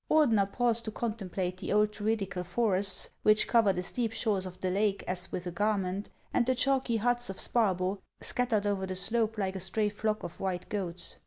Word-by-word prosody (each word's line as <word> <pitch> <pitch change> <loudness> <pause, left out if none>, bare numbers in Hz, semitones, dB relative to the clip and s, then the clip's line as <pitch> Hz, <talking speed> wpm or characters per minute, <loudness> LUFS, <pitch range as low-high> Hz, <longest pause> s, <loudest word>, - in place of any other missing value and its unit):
Ordener 225 -11 +4
paused 235 -1 +1
to 220 - -3
contemplate 195 -5 -3
the - - -5
old 210 0 +3
Druidical 205 -4 -1
forests, 195 0 +2
which 215 0 +4
cover 225 -4 +4
the 180 -1 -2
steep 230 +3 -1
shores 205 -5 0
of 180 0 -10
the 185 - -1
lake 200 +1 +1
as 180 0 -2
with 180 - -4
a 175 - -3
gar 210 +4 +1
ment, 190 +1 -3 0.2
and 245 - +3
the 260 - +3
chalky 260 -2 +2
huts 240 +1 0
of 190 - -5
Sparbo, 195 -4 +1 0.2
scattered 235 -5 0
over 195 -2 0
the 185 - -4
slope 220 +3 +1
like 195 -2 -1
a - - -3
stray 210 +4 0
flock 215 +1 -2
of 170 - -7
white 185 -2 -2
goats. 180 -4 -3
205 Hz, 200 wpm, -30 LUFS, 185-225 Hz, 0.2 s, Ordener